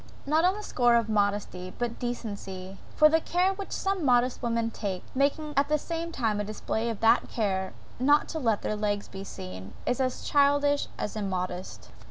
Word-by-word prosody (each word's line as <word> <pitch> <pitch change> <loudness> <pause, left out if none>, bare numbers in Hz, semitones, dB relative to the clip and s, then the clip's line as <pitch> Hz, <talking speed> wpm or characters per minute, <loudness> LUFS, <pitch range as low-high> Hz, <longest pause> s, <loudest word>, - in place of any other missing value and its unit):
Not 310 +3 +3
on 370 +2 +3
the 425 - -6
score 240 -10 +3
of 230 -2 +2
modesty, 205 -3 0
but 240 -1 -3
decency; 200 -6 -5 0.2
for 305 - +7
the 320 +1 +3
care 365 +4 +2
which 390 0 -7
some 385 -3 -1
modest 250 -2 +3
women 230 -1 0
take, 195 -5 -4
making 290 +3 0
at 280 +1 +2
the 305 - +3
same 335 +2 -4
time 225 -8 0
a - - 0
display 220 +2 -2
of 225 - -5
that 230 +2 +4
care, 190 -4 -1 0.3
not 290 +4 +4
to 320 - -3
let 225 -7 +1
their 215 - -1
legs 205 -1 -1
be 195 0 -8
seen, 95 - -8
is 250 +1 0
as 255 -1 -1
childish 285 0 +3
as 210 - -3
immodest. 185 -3 -4
235 Hz, 190 wpm, -28 LUFS, 205-285 Hz, 0.3 s, for